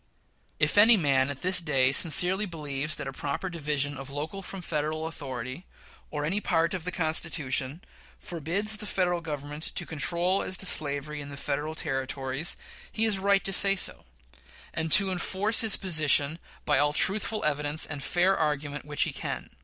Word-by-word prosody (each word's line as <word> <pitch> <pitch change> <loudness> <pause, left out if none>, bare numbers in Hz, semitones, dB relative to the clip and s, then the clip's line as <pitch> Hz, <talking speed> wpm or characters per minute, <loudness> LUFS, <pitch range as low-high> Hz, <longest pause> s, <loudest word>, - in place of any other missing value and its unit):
If - - +2
any 225 +2 +7
man 135 -5 +1
at 140 +2 -7
this 185 0 +2
day 135 -5 +1
sincerely 180 +7 +5
believes 150 -3 -3
that 135 -2 -6
proper 145 +7 -4
division 145 -3 -2
of 135 0 -9
local 150 +8 -6
from 195 -1 -9
Federal 155 0 -3
authority, 135 -1 -7 0.4
or 150 -1 -4
any 195 +7 0
part 165 -3 0
of 180 -3 -5
the 180 - -2
Constitution, 160 -4 0 0.3
forbids 180 +7 0
the 210 -1 -5
Federal 180 -3 0
Government 150 -1 -7
to - - -1
control 170 +5 0
as 185 - -2
to - - -1
slavery 150 -3 +1
in 140 - -9
the 140 - -9
Federal 150 +3 -4
Territories, 135 0 -3 0.3
he 225 - +2
is 210 -3 +2
right 200 0 +2
to 195 - 0
say 195 +1 +5
so, 185 - +1 0.7
and 160 0 -3
to 195 +2 +6
enforce 195 +6 +1
his 220 -3 +2
position 155 -3 +2 0.3
by 145 -3 +2
all 145 0 +2
truthful 210 +5 +2
evidence 150 +1 0
and 145 -2 -7
fair 180 +5 +1
argument 150 -2 -3
which 145 -1 -1
he - - -3
can. - - -6
155 Hz, 170 wpm, -27 LUFS, 145-185 Hz, 0.7 s, any